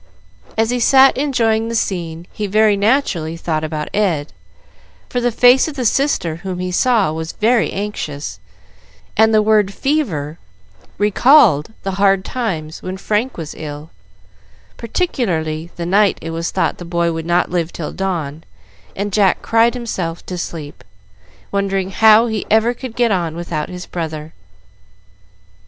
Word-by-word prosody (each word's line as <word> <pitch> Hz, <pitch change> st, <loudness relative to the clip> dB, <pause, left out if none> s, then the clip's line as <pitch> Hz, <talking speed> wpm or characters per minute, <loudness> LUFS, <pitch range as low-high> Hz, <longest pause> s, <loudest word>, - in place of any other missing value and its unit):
As 225 Hz, +1 st, +2 dB
he 245 Hz, -, 0 dB
sat 265 Hz, +3 st, +6 dB
enjoying 230 Hz, -5 st, +1 dB
the 230 Hz, -, -3 dB
scene, 170 Hz, -5 st, -2 dB
he 210 Hz, -, -3 dB
very 215 Hz, +1 st, +3 dB
naturally 200 Hz, -, 0 dB
thought 160 Hz, -2 st, -2 dB
about 155 Hz, -1 st, -3 dB
Ed; 175 Hz, -8 st, 0 dB, 0.8 s
for 245 Hz, -, -1 dB
the 245 Hz, 0 st, +1 dB
face 245 Hz, +5 st, +5 dB
of 310 Hz, -, -6 dB
the 255 Hz, -3 st, -3 dB
sister 215 Hz, -, +1 dB
whom 185 Hz, +1 st, -5 dB
he 180 Hz, 0 st, -3 dB
saw 215 Hz, -3 st, +2 dB
was 160 Hz, +1 st, -5 dB
very 230 Hz, +1 st, +2 dB
anxious, 155 Hz, -, -5 dB, 0.8 s
and 220 Hz, +2 st, +4 dB
the 215 Hz, -1 st, +4 dB
word 210 Hz, -2 st, +3 dB
"fever" 190 Hz, -, -2 dB, 0.6 s
recalled 210 Hz, -, +4 dB
the 195 Hz, -, -2 dB
hard 195 Hz, -1 st, +3 dB
times 170 Hz, -11 st, -4 dB
when 185 Hz, +1 st, -5 dB
Frank 215 Hz, +6 st, -1 dB
was 160 Hz, -3 st, -6 dB
ill, 150 Hz, 0 st, -8 dB, 0.8 s
particularly 175 Hz, -, -2 dB
the 170 Hz, -, -4 dB
night 200 Hz, +3 st, +3 dB
it 165 Hz, -, -6 dB
was 165 Hz, +1 st, -3 dB
thought -, -, -1 dB
the -, -, -7 dB
boy 170 Hz, 0 st, 0 dB
would 165 Hz, 0 st, -5 dB
not 175 Hz, 0 st, +1 dB
live 170 Hz, -2 st, -1 dB
till 155 Hz, -, -5 dB
dawn, 165 Hz, -6 st, -3 dB, 0.5 s
and 200 Hz, 0 st, -3 dB
Jack 195 Hz, -3 st, +2 dB
cried 230 Hz, +2 st, +3 dB
himself 185 Hz, -9 st, -4 dB
to 180 Hz, -, -5 dB
sleep, 160 Hz, -4 st, -7 dB, 0.7 s
wondering 195 Hz, -1 st, -1 dB
how 220 Hz, +2 st, +6 dB
he 220 Hz, -3 st, -2 dB
ever 220 Hz, +2 st, +3 dB
could 245 Hz, -1 st, -8 dB
get 240 Hz, -2 st, +2 dB
on 170 Hz, -4 st, -1 dB
without 170 Hz, -3 st, -4 dB
his 180 Hz, 0 st, -7 dB
brother. 160 Hz, -2 st, -5 dB
195 Hz, 150 wpm, -18 LUFS, 165-225 Hz, 0.8 s, sat